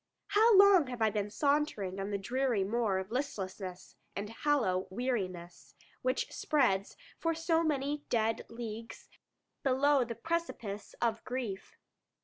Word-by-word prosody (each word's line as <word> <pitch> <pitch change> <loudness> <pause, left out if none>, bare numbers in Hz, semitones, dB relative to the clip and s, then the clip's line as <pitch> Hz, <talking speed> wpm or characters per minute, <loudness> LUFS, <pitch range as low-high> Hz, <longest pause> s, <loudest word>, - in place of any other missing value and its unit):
How 425 +1 +6
long 390 -6 +7
have 245 -1 -5
I 220 -1 +3
been 205 0 -1
sauntering 280 -8 0
on 195 +1 -3
the 200 - -1
dreary 240 +1 0
moor 210 -1 +1
of 190 +2 -4
listlessness 195 -8 -4 0.2
and 205 +2 -4
hollow 225 -9 +1
weariness, 185 - -4 0.3
which 255 +1 0
spreads, 220 -10 +1 0.2
for 330 -1 0
so 330 0 +2
many 290 -1 -1
dead 225 -1 0
leagues, 230 -1 -7 0.5
below 275 +1 +3
the 230 -1 -5
precipice 235 -9 -4
of 225 -1 0
grief? 245 -7 -5
235 Hz, 130 wpm, -32 LUFS, 200-285 Hz, 0.5 s, long